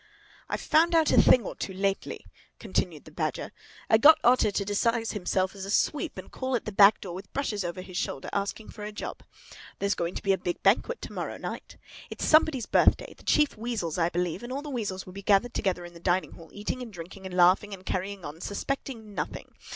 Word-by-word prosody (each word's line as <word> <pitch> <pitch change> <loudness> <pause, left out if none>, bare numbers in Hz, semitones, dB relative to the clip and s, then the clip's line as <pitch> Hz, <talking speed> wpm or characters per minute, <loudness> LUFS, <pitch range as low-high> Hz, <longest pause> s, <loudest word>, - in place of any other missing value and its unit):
"I've - - -2
found 335 +2 +3
out 320 -2 +4
a - - +7
thing 255 - +6
or - - -4
two 190 - -5
lately," 195 0 -2 0.3
continued - - -2
the - - -13
Badger. - - -3 0.4
"I 220 - +5
got 310 +6 +8
Otter 245 -2 +5
to 200 0 -1
disguise 225 +3 +1
himself 185 -1 -1
as 195 -2 -8
a 195 - -6
sweep 300 - 0
and 185 - -9
call 260 0 -2
at 235 - -2
the 215 - -4
back 200 +1 +6
door 180 -3 -6
with 190 +3 -9
brushes 215 -8 -1
over 175 +1 -4
his 185 -1 -8
shoulder, 135 - -3
asking 200 +2 -3
for 210 - -9
a 210 - -5
job. 210 - -6 0.6
There's 200 0 +1
going 170 +1 -3
to - - -5
be 195 - +3
a 190 - -1
big 175 - -4
banquet 230 - +2
to - - -7
morrow - - -4
night. - - -7 0.3
It's - - -4
somebody's 310 -6 +4
birthday—the - - +2
Chief 300 -1 +3
Weasel's, 215 -8 -3
I 165 0 +3
believe—and 180 +7 -3
all 275 +2 -3
the 295 - -6
weasels 205 -7 -3
will 185 - -11
be 200 - -7
gathered 200 +4 +3
together 180 -3 -1
in 175 - -11
the 170 - -12
dining 180 +2 0
hall, 165 -1 -13
eating 210 +5 -4
and 240 -3 -7
drinking 190 +1 -9
and 180 -1 -6
laughing 185 +4 +5
and 190 -1 -9
carrying 190 -1 -3
on, 150 +3 -8
suspecting 225 0 -4
nothing. - - -5
200 Hz, 220 wpm, -28 LUFS, 185-235 Hz, 0.6 s, got